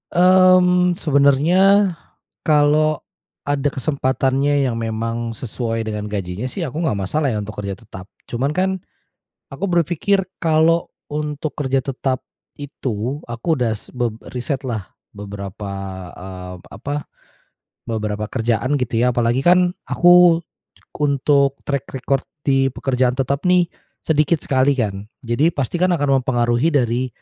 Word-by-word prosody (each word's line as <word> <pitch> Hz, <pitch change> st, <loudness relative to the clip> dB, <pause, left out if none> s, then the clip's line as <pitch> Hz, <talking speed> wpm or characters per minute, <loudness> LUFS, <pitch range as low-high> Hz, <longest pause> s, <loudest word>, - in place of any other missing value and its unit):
Mmm, 180 Hz, 0 st, +5 dB
sebenarnya 170 Hz, +8 st, +4 dB, 0.5 s
kalau 150 Hz, 0 st, +3 dB, 0.5 s
ada 145 Hz, 0 st, +1 dB
kesempatannya 135 Hz, 0 st, +1 dB
yang 120 Hz, -, -1 dB
memang 115 Hz, +1 st, -3 dB
sesuai 115 Hz, -1 st, -4 dB
dengan 105 Hz, -1 st, -4 dB
gajinya 100 Hz, +4 st, -4 dB
sih, 170 Hz, +1 st, -3 dB
aku 155 Hz, +6 st, -4 dB
nggak 105 Hz, -11 st, 0 dB
masalah 135 Hz, +9 st, 0 dB
ya 110 Hz, -, -1 dB
untuk 105 Hz, +1 st, -6 dB
kerja 100 Hz, 0 st, -5 dB
tetap. 100 Hz, -4 st, -12 dB, 0.2 s
Cuman 130 Hz, +4 st, -1 dB
kan, 185 Hz, +3 st, -1 dB, 0.6 s
aku 135 Hz, +8 st, -6 dB
berpikir 175 Hz, +3 st, +1 dB, 0.2 s
kalau 165 Hz, +1 st, +3 dB, 0.2 s
untuk 150 Hz, 0 st, -4 dB
kerja 135 Hz, -2 st, 0 dB
tetap 130 Hz, 0 st, -3 dB, 0.3 s
itu 130 Hz, -2 st, -4 dB
aku 120 Hz, +4 st, -7 dB
udah 120 Hz, -3 st, 0 dB
s -, -, -15 dB
beb 120 Hz, -3 st, -2 dB, 0.2 s
riset 130 Hz, +2 st, -3 dB
lah 110 Hz, -6 st, -4 dB, 0.2 s
beberapa, 100 Hz, 0 st, -7 dB, 0.5 s
eee, 90 Hz, -1 st, -8 dB
apa, 145 Hz, +1 st, -5 dB, 0.8 s
beberapa 105 Hz, -1 st, -2 dB
kerjaan 120 Hz, +3 st, 0 dB
gitu 125 Hz, -4 st, -1 dB
ya. 125 Hz, 0 st, +2 dB
Apalagi 120 Hz, +1 st, +2 dB
kan, 180 Hz, +4 st, +4 dB, 0.2 s
aku 175 Hz, -1 st, +6 dB, 0.6 s
untuk 140 Hz, -1 st, +2 dB
track 140 Hz, -2 st, -2 dB
record 135 Hz, +1 st, 0 dB, 0.2 s
di 135 Hz, -1 st, +3 dB
pekerjaan 125 Hz, -1 st, 0 dB
tetap 140 Hz, +5 st, -1 dB
nih 180 Hz, -1 st, +4 dB, 0.4 s
sedikit 155 Hz, +1 st, +2 dB
sekali 135 Hz, +1 st, +2 dB
kan. 105 Hz, -5 st, -2 dB, 0.2 s
Jadi, 120 Hz, +7 st, +2 dB
pasti 145 Hz, +2 st, -3 dB
kan 180 Hz, -1 st, +3 dB
akan 140 Hz, -4 st, +2 dB
mempengaruhi 120 Hz, +3 st, +1 dB
dari 125 Hz, -1 st, +1 dB
135 Hz, 130 wpm, -20 LUFS, 115-155 Hz, 0.8 s, aku